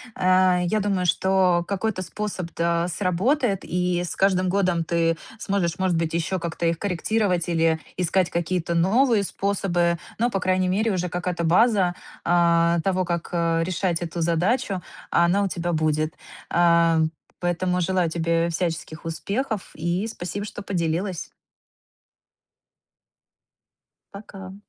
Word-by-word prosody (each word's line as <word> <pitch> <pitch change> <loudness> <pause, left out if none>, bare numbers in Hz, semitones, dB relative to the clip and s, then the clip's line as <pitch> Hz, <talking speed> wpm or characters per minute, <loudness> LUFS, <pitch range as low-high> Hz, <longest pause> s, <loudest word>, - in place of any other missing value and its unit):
э, 185 -1 +3
я 215 +5 +1
думаю, 195 -3 0
что 180 0 +2
какой-то 200 0 -2
способ 185 -1 -5
т 170 - -3 0.2
э, - - -2
сработает. 195 - +1
И 180 0 -1
с 175 - -5
каждым 185 -1 +2
годом 180 -3 +1
ты 165 0 +1 0.2
сможешь, 190 -5 -1
может 185 -3 +1
быть, 165 -1 -1
ещё 170 +3 -1
как-то 170 0 -3
их 165 0 +1
корректировать, 185 -2 0
или 165 -1 +2 0.2
искать 180 0 +1
какие-то 170 0 -1
новые 215 +5 +3
способы. 180 -4 0 0.2
Но 240 +2 +2
по 195 - -1
крайней 185 0 +1
мере, 215 +4 +1
уже 180 -2 -1
какая-то 175 0 -2
база, 185 +1 +3 0.3
а, 170 0 +3
того 185 -1 +1
как, 170 -1 -3
э, 165 -1 +1
решать 180 -1 -1
эту 170 0 -4
задачу, 185 +5 0 0.3
она 175 +4 +3
у 200 - +1
тебя 175 -1 -2
будет. 155 0 0 0.4
Ам, 170 -2 +4 0.3
поэтому 180 +1 0
желаю 180 -1 +1
тебе 165 0 0
всяческих 165 -1 -3
успехов, 200 +6 -3
и 175 +6 -1
спасибо, 205 -1 -5
что 205 - -7
поделилась. 175 -1 -2 2.9
Пока. 195 -2 -10
180 Hz, 135 wpm, -24 LUFS, 170-195 Hz, 2.9 s, Ам